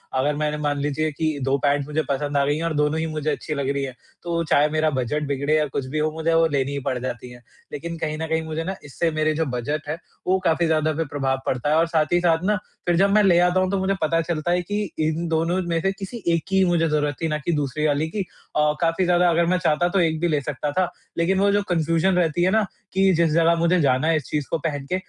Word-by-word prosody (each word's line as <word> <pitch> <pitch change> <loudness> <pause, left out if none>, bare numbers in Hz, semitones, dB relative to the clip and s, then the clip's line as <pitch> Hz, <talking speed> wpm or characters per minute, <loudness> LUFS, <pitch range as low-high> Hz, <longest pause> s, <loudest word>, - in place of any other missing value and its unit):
अगर 145 +3 +1
मैंने 150 0 -1
मान 145 -1 -1
लीजिए 150 +2 -1
कि 155 0 -2
2 135 +1 +1
पैन्ट 140 -1 +2
मुझे 155 +1 -1
पसंद 145 +1 -1
आ 140 - +3
गई 145 +1 +1
हैं 165 - -3
और 165 -1 -1
दोनों 150 +2 +1
ही 165 - -1
मुझे 155 -1 -3
अच्छी 155 - -4
लग 140 -1 -2
रही 140 0 -1
हैं 130 -2 -5 0.3
तो 170 -1 -1
चाहे 150 -1 +3
मेरा 155 0 +1
बजट 140 +2 -1
बिगड़े 140 +2 0
या 150 - +2
कुछ 130 0 -4
भी 155 +2 -2
हो 155 +1 +1
मुझे 160 +1 -1
वो 165 0 +4
लेनी 140 0 0
ही 140 - -2
पड़ 130 - 0
जाती 125 0 -5
है। 120 0 -13 0.3
लेकिन 165 +3 -5
कहीं 155 -1 -3
न 160 0 -3
कहीं 160 0 0
मुझे 160 +1 -3
ना 190 +3 -3
इससे 165 +4 -1
मेरे 155 0 +1
जो 160 +1 0
बजट 145 +5 -3
है 155 - -2 0.3
वो 190 +1 +3
काफ़ी 165 +1 +2
ज़्यादा 155 -1 +1
फिर 165 0 -1
प्रभाव 135 -2 -1
पड़ता 130 +3 -1
है 155 - +3
और 165 +1 +3
साथ 160 -2 +2
ही 175 - +4
साथ 165 0 +2
ना 210 0 +2 0.3
फिर 175 -1 +2
जब 195 +2 +4
मैं 210 - +5
ले 175 -3 +5
आता 180 +1 +3
हूँ 185 0 +1
तो 195 - +1
मुझे 190 +1 +1
पता 165 +1 +2
चलता 165 0 -2
है 180 0 +2
कि 205 +4 -3 0.2
इन 160 +2 0
दोनों 165 +3 +1
में 165 -1 0
से 195 +1 +1
किसी 200 +4 -8
एक 160 - -2
की 190 0 +3
मुझे 170 -2 +2
ज़रूरत 150 -2 0
थी 165 - +1
ना 150 -1 -1
कि 170 - +1
दूसरी 150 0 -1
वाली 150 +2 +1
की 210 - -5 0.4
अ, 150 0 +3
काफ़ी 165 +2 +1
ज़्यादा 175 0 +3
अगर 170 0 +2
मैं 180 +1 +2
चाहता 165 +1 +1
तो 195 - +1
एक 160 -2 +1
भी 175 - +1
ले 150 -3 +1
सकता 145 +1 -3
था। 185 +2 0 0.3
लेकिन 190 +3 +2
वो 200 0 +3
जो 205 0 +2
कन्फ़्यूज़न 165 +2 +2
रहती 175 -1 +1
है 185 - +3
ना 220 0 +3 0.3
कि 190 0 +4
जिस 165 -1 +3
जगह 165 +1 +4
मुझे 170 +2 +2
जाना 135 +2 +2
है 165 - +3
इस 145 - -4
चीज़ 150 -2 -1
को 165 - 0
पहन 145 -3 -3
के 185 - +1
160 Hz, 275 wpm, -23 LUFS, 150-170 Hz, 0.4 s, मैं